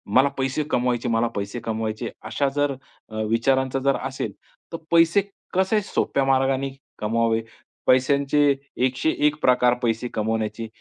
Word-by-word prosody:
मला 130 +2 +6
पैसे 135 +3 0
कमवायचे, 125 -1 0
मला 115 +1 +2
पैसे 100 +4 -3
कमवायचे 110 0 -3 0.2
अशा 140 +5 0
जर 145 -1 +1 0.6
विचारांचा 130 +3 +1
जर 140 +1 +2
असेल 135 0 -4 0.4
तर - - -2
पैसे 170 +3 +5 0.3
कसे 190 +3 +2
सोप्या 140 -7 0
मार्गाने 135 0 +2 0.3
कमवावे. 115 +1 +1 0.5
पैशांचे 140 +2 +3 0.3
101 150 +3 +1
प्रकार 125 -1 +4
पैसे 115 +1 0
कमवण्याचे, 110 +1 -2
130 Hz, 120 wpm, -23 LUFS, 115-140 Hz, 0.6 s, मला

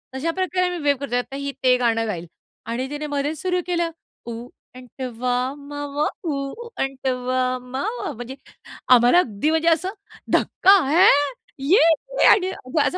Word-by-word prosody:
तशा 310 +5 -1
प्रकारे 370 +1 0
आम्ही 355 -1 -3
वेव्ह 285 -2 +1
करतोय. 245 -3 -1
आता 270 +2 -6
ही 280 0 -4
ते 250 -1 +5
गाणं 225 -2 +1
गाईल 175 -4 -4 0.4
आणि 250 +3 -3
तिने 295 +1 -5
मध्येच 290 +2 -2
सुरु 360 0 0
केलं. 345 -1 0 0.4
ऊ 235 +1 -6 0.3
आंटावा 250 -1 -5 0.3
मावा 290 0 -4 0.2
ऊ 275 -3 -3 0.3
आंटावा 255 -1 -1
मावा 275 - -4
म्हणजे, 245 +2 -8 0.6
आम्हाला 245 +7 +6
अगदी 250 - 0
म्हणजे 320 +1 +1
असं 335 +3 +1 0.4
धक्का! 385 - +4 0.2
ह्या! 345 +6 +6 0.6
ये 345 +9 +5 0.4
क्या 340 -7 +3
असा 365 - -2
275 Hz, 145 wpm, -22 LUFS, 250-325 Hz, 0.6 s, आम्हाला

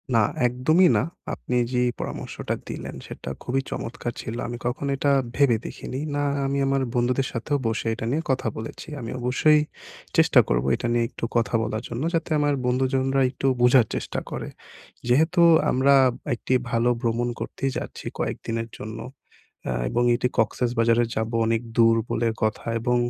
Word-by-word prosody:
না - - +6 0.3
একদমই 155 +9 +4
না। - - +2 0.3
আপনি 125 - -4 0.2
যে 125 - +2 0.2
পরামর্শটা - - -4
দিলেন - - -6
সেটা - - -7
খুবই 135 +2 0
চমৎকার 120 0 -4
ছিল। 110 - -5
আমি 120 0 -5
কখনো 135 +3 -2
এটা 140 +1 +2 0.2
ভেবে 135 -5 +4
দেখিনি। 130 - -6 0.2
না, 145 - 0 0.2
আমি 140 +1 0
আমার 135 0 +1
বন্ধুদের 125 +2 +1
সাথেও 135 +5 -1
বসে 110 0 -2
এটা 115 - -5
নিয়ে 155 +3 0
কথা 130 - -1
বলেছি। 110 +8 -7
আমি 115 -2 -5
অবশ্যই 145 +5 +4 0.6
চেষ্টা - - +6
করবো - - +1
এটা 120 - -3
নিয়ে 120 -1 +2
একটু - - -5
কথা 115 0 +1
বলার 110 +2 -3
জন্য, 120 +4 -3
যাতে 165 0 -1
আমার 145 0 +2
বন্ধুজনরা 130 +1 +1
একটু 135 - -2
বোঝার 125 -1 +6
চেষ্টা - - -3
করে। - - -4 0.6
যেহেতু 160 +8 +3 0.3
আমরা 135 +2 +4 0.4
একটি 130 - -2 0.2
ভালো 115 +1 +2
ভ্রমণ 120 +1 0
করতেই 135 -1 -3
যাচ্ছি - - -7
কয়েকদিনের 115 0 -3
জন্য। 110 +1 -7 0.7
আ - - -1 0.2
এবং 120 - +1
এটি 125 +1 +1
'কক্সসবাজারে' 115 +1 +2
যাবো 110 +1 -2
অনেক 115 0 +1
দূর 115 -1 +5
বলে 115 +1 +1
কথা, 110 0 0 0.2
এবং 125 +1 +1
125 Hz, 160 wpm, -24 LUFS, 115-135 Hz, 0.7 s, না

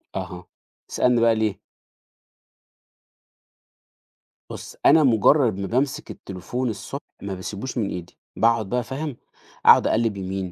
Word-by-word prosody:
أها، - - -6 0.4
اسألني 125 -2 +2
بقى 115 -1 +4
ليه. 110 -3 -1 2.9
بُص، - - -9
أنا 160 -1 +7
مُجرّد 115 -2 +4
ما 100 - -3
بامسِك 130 +4 -1
التليفون 110 +7 -5
الصبح، 110 - -6 0.2
ما 100 -1 -4
باسيبوش 100 +7 -6
من 105 -4 0
إيدي. 90 -1 -7 0.2
باقعُد 115 -3 +2
بقى 125 -1 0
فاهم، 140 +1 -5 0.5
أقعُد - - +7
أقلِّب 110 -2 +1
يمين، 95 -1 -4
115 Hz, 120 wpm, -23 LUFS, 95-125 Hz, 2.9 s, أنا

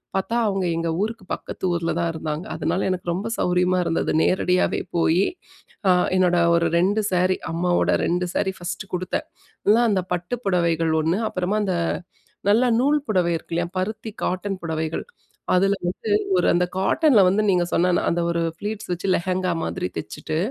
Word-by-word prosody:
பாத்தா 210 +5 0
அவங்க 195 -2 0
எங்க 165 0 -1
ஊருக்கு 220 -2 -5
பக்கத்து - - -5
ஊர்ல 170 -1 -1
தான் 170 -1 0
இருந்தாங்க. 155 +1 -4
அதனால, 190 - -1
எனக்கு 180 -1 -2
ரொம்ப 200 +6 -3
சௌரியமா 180 +1 +2
இருந்தது. 165 - 0
நேரடியாவே 180 0 +1 0.2
போயி, 170 +3 +3 0.6
அ - - +7 0.3
என்னோட 180 -1 +3 0.2
ஒரு 170 0 +1
2 205 +5 +2
ஸேரி. 185 +1 +2 0.2
அம்மாவோட 175 +1 +1
2 180 +1 0
சேரி 190 - 0
ஃபஸ்ட்டு 180 +2 -6
குடுத்தேன். 180 +1 -3 0.4
அதுல 225 +4 +4
அந்த 190 -2 +1
பட்டு 180 +7 -3
புடவைகள் 170 -3 +1
1. 165 +5 +1
அப்புறமா, 185 +3 -1
அந்த 185 -2 0 0.7
நல்ல 230 +5 +4 0.2
நூல் 295 +3 +3
புடவை 180 -5 +2
இருக்குல்லையா? 170 +2 -3
பருத்தி, 215 +3 -3 0.2
காட்டன் 185 +1 -2
புடவைகள். 160 -1 -3 0.5
அதில 195 +2 +3
வந்து, 200 +4 -4 0.3
ஒரு 175 - +2
அந்த 180 +1 +2
காட்டன்ல 235 +4 +4
வந்து, 200 +4 +2
நீங்க 180 -2 +3
சொன்ன 180 +1 +2 0.2
அந்த 170 +1 0
ஒரு 170 0 0 0.2
ப்ளீட்ஸ் 210 -1 -5
வச்சு, 180 +2 -3
லெஹங்கா 185 +1 -1
மாதிரி 180 +2 -2
தச்சுட்டு, 155 - -4
180 Hz, 160 wpm, -23 LUFS, 175-195 Hz, 0.7 s, அ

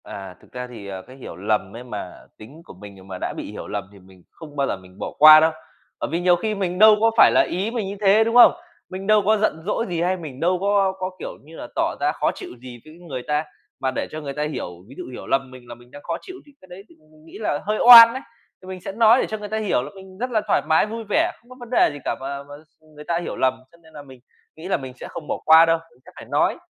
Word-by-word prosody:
À, 95 -2 -9
thực - - -22
ra 125 0 -6
thì, 110 -5 -10
à, 95 -1 -7
cái 130 - -13
hiểu 130 - -10
lầm 100 +1 -2
ấy 120 - -8
mà 105 -7 -7 0.3
tính 135 +10 -14
của - - -13
mình 95 0 -14
mà 95 -1 -7
đã - - -3
bị - - -7
hiểu - - -8
lầm - - -4
thì 100 - -17
mình 95 -1 -20
không 155 -3 -13
bao 140 -1 0
giờ - - -3
mình 95 0 -18
bỏ - - -5
qua 155 +1 +10
đâu, 160 +1 +3 0.5
bởi - - -3
vì 165 - -1
nhiều 175 0 +3
khi 215 +4 -3
mình 185 -2 -3
đâu 215 0 +8
có 225 0 +4
phải - - +7
là - - +4
ý 195 +5 -2
mình 230 -5 -3
như 200 - -6
thế, 205 +2 +5
đúng 230 +1 -2
không? 245 - +8 0.4
Mình 190 +1 -7
đâu 215 0 +4
có 215 +1 +3
giận 200 -7 -1
dỗi 215 +3 -1
gì 170 -2 -2
hay 185 +2 0
mình 150 -7 -9
đâu 180 +3 +1
có 200 -1 +2
có, 185 0 -3
kiểu - - -6
như 160 +3 -15
là, - - -8
tỏ - - -1
ra - - +1
khó - - -1
chịu - - -9
gì 125 -1 -11
với 155 - -14
người 130 -5 -5
ta, 150 +1 0 0.4
mà 130 -1 -1
để - - -3
cho 155 - -6
người 140 -2 -6
ta 150 +1 -3
hiểu 150 -10 -4 0.2
ví 135 - -14
dụ - - -7
hiểu 125 - -9
lầm 135 -1 -1
mình 130 -1 -14
là 120 - -9
mình 120 +1 -20
đang 145 - -12
khó 170 -1 -3
chịu 370 - -11
thì 290 - -19
cái 185 - -18
đấy 180 +2 -11
thì - - -20 0.2
mình 155 0 -22
nghĩ - - -12
là 145 -8 -1
hơi 215 +1 -1
oan 230 -1 +11
ấy. 260 - -6 0.4
Thì 185 - -15
mình 185 -1 -8
sẽ - - -6
nói 225 +4 +4
để - - -1
cho 220 - -5
người 210 0 -8
ta 220 - -2
hiểu 210 -12 0
là - - -8
mình 190 -1 -14
rất 250 +4 -3
là 220 -2 +1
thoải - - +2
mái, 160 - +4
vui 225 +2 -6
vẻ, 330 +9 +1
không 240 - -28
có 255 - -12
vấn 240 -1 -11
đề 250 - +3
gì 145 - -9
cả - - -1
và 140 +1 -6
và 145 0 -12
s 155 - -47
ừm, 155 0 -23
người 150 - -11
ta 170 +2 -2
hiểu 175 - -6
lầm. 130 -1 +1 0.2
Cho 170 - -21
nên 160 0 -20
là 150 - -10
mình 130 -2 -15 0.4
nghĩ 160 +3 -10
là 195 - 0
mình 130 -2 -9
sẽ - - -8
không 150 - -9
bỏ - - -2
qua 160 +1 +7
đâu. 165 0 +1
Mình 125 - -27
sẽ - - -15
phải - - -11
nói. - - 0
160 Hz, 310 wpm, -22 LUFS, 130-200 Hz, 0.5 s, oan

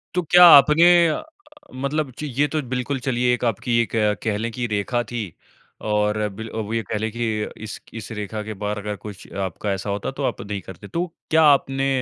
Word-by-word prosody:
तो 180 - +2
क्या 175 +2 +7
आपने 150 +1 +8 0.2
अ, 155 - -2 0.5
मतलब 140 +2 -2
ची 150 - -4
ये 145 - +4
तो 155 +1 -2
बिल्कुल 130 +2 -2
चलिए 125 -1 +1
एक 125 - -3
आपकी 120 +2 0
एक 115 - -4
अ, 105 -2 +2
कह 105 -3 0
लें 115 +2 -3
कि 120 +1 -3
रेखा 105 +3 -1
थी 120 -1 -2 0.7
और 105 0 +1
बिल 110 +3 -8
वो 110 0 -3
ये 115 - 0
कह 110 - -1
लें 110 +1 -2
कि 120 +2 -3 0.4
इस 110 -2 -7
इस 115 0 -8
रेखा 105 +1 -4
के 110 +1 -6
बाहर 105 0 -2
अगर 105 0 -4
कुछ 105 -2 -10
आपका 95 +3 -4
ऐसा 95 +1 -3
होता 100 0 -2
तो - - -3
आप - - -2
नहीं 100 -1 -5
करते। 95 +2 -11
तो 170 - -2 0.2
क्या 160 0 +4
आपने 135 -2 +3
115 Hz, 215 wpm, -22 LUFS, 105-135 Hz, 0.7 s, आपने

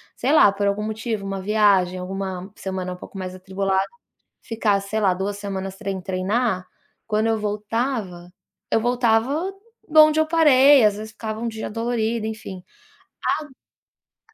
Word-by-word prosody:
sei - - 0
lá, 205 -10 +7
por 200 +1 -1
algum 200 +1 0
motivo 220 -1 -3
uma 195 -1 -4
viagem 195 -3 +3
alguma 190 0 -5
semana 185 -1 -4
um - - -10
pouco 195 - -11
mais 185 -1 -5
atribulada, 190 +1 -1 0.6
ficar 215 -4 0
sei 200 +2 -3
lá, 195 -3 +3
2 200 +2 -3
semanas 195 -2 -5
sem 195 -1 -4
treinar. 190 +1 -1 0.4
Quando 215 0 +1
eu 225 - +1
voltava, 210 -3 -3 0.4
eu 225 - +3
voltava 245 - +1 0.4
donde 310 0 +6
eu 315 - +2
parei 290 -4 +6
às 205 -1 +3
vezes 215 +1 -8
ficava 220 -1 -5
um 235 - -3
dia 220 -1 -5
dolorido 230 0 -1
enfim 205 -4 -7 1.6
ago - - -28
210 Hz, 150 wpm, -22 LUFS, 190-230 Hz, 1.6 s, lá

